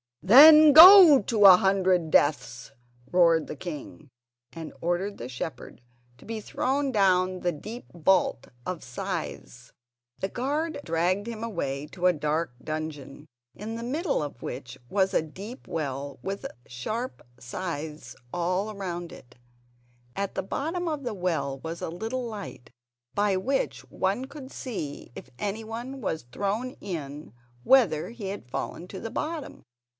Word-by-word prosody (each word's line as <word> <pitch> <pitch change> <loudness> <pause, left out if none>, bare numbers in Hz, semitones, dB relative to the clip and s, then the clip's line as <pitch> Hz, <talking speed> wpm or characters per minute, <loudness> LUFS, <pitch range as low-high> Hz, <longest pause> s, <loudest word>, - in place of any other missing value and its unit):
"Then 300 +8 +9
go 335 - +11
to 210 0 +2
a 185 -2 +10
hundred 185 -3 +2
deaths!" 125 -5 +1 0.4
roared 170 -3 +4
the - - -6
king, 150 -2 -8 0.4
and 165 -2 -8
ordered 175 +4 -1
the 120 - -7
shepherd 130 0 -7 0.4
to - - -17
be 225 -1 -5
thrown 270 +6 -1
down 185 -3 +2
the 175 - 0
deep 215 +10 -9
vault 175 -6 +1 0.2
of 185 -2 -5
scythes. 125 - -6 0.5
The 190 - -1
guards 290 +7 -2
dragged 180 +6 0
him 230 -1 -6
away 145 -10 -3
to 180 +3 -5
a 180 - +5
dark 150 -1 -2
dungeon, 155 -2 -6 0.3
in 220 +2 -6
the 230 - -6
middle 290 - -1
of 140 -5 -8
which 125 0 -7
was 190 -1 +1
a - - +2
deep 200 - -10
well 140 -3 -4
with 195 +1 -5 0.2
sharp 220 - -5 0.2
scythes 150 -2 -6 0.2
all 185 +5 -1
round 175 -3 -5
it. 120 -1 -14 0.8
At 200 0 -3
the - - -2
bottom 330 - -3
of 305 -3 -3
the 240 -4 -4
well 155 -7 -2
was 165 +3 -7
a - - -3
little 225 +9 -4
light 210 - -8 0.4
by 205 -2 +2
which 265 +8 -1
one 200 +7 -1
could 275 -1 -11
see 160 - -6
if - - -10
anyone 225 +6 -5
was 160 - -3
thrown 210 - -2
in 150 - -7 0.3
whether 210 - +3
he 230 -4 -7
had 195 -10 -7
fallen 170 +6 -5
to 190 - -7
the 225 - -6
bottom. 315 -1 -5
190 Hz, 145 wpm, -26 LUFS, 155-230 Hz, 0.8 s, go